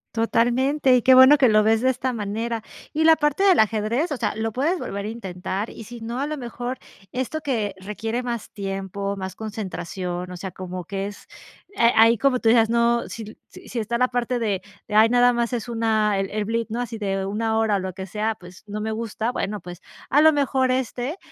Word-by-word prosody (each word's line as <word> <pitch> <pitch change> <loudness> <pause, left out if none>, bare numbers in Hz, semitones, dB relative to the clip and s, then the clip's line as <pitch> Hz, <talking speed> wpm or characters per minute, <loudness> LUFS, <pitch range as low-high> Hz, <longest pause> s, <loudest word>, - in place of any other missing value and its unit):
Totalmente. 250 +4 +2
Y 245 - +3
qué 260 +2 +6
bueno 260 +3 +8
que 255 -4 +5
lo 215 0 +5
ves 220 +1 +3
de 260 - +3
esta 260 0 -1
manera. 225 +1 -3 0.3
Y 315 +1 +1
la 320 0 +7
parte 295 +2 0
del 380 -3 +5
ajedrez, 220 - +1
o 285 - -1
sea, 220 -4 -1
lo 225 0 -2
puedes 290 - 0
volver 200 - -5
a - - -3
intentar. 195 -1 -5
Y 225 - -10
sí 240 0 -10
no, 235 +3 -4
a 280 - -1
lo 305 0 -4
mejor 245 +1 -5 0.3
esto 260 +5 -3
que, 225 -9 -1
requiere 220 +4 -3
más 235 -3 -5
tiempo, 195 0 -4
más 190 -1 -5
concentración, 185 -4 -5
o 180 - -7
sea, 190 +1 -6
como 180 -1 -7
que 195 +1 -3
es 205 - -10 0.5
eh, 235 0 +4
ahí 225 0 +6
como 270 -1 +3
tú 225 - +2
dices 225 -1 +5
no, 235 0 +2
sí 220 -1 -8
sí - - -14
sí 240 - -4
está 235 +2 -1
la 250 +1 +3
parte 245 0 -1
de 205 -5 -1 0.3
de 210 - -7
ay, 220 +1 +7
nada 245 0 +4
más 235 +1 -1
es 240 0 -3
una 220 -3 +1
el 195 - -2
el 210 0 -2
blitz, 230 +1 -2
¿no?, 230 - -3
así 230 -2 -5
de 195 -1 -1
una 220 +3 -1
hora 220 -2 +2
o - - -2
lo 185 0 -4
que 190 +1 -6
sea, 215 +3 -2
pues, 180 0 -14
no 210 +1 -5
me 220 - -2
gusta, 225 +1 -3
bueno, 210 -4 -3
pues 175 +1 -10 0.3
a 290 +3 +5
lo 315 0 +7
mejor 265 -2 +1
éste, 255 +4 -2
225 Hz, 230 wpm, -23 LUFS, 205-245 Hz, 0.5 s, bueno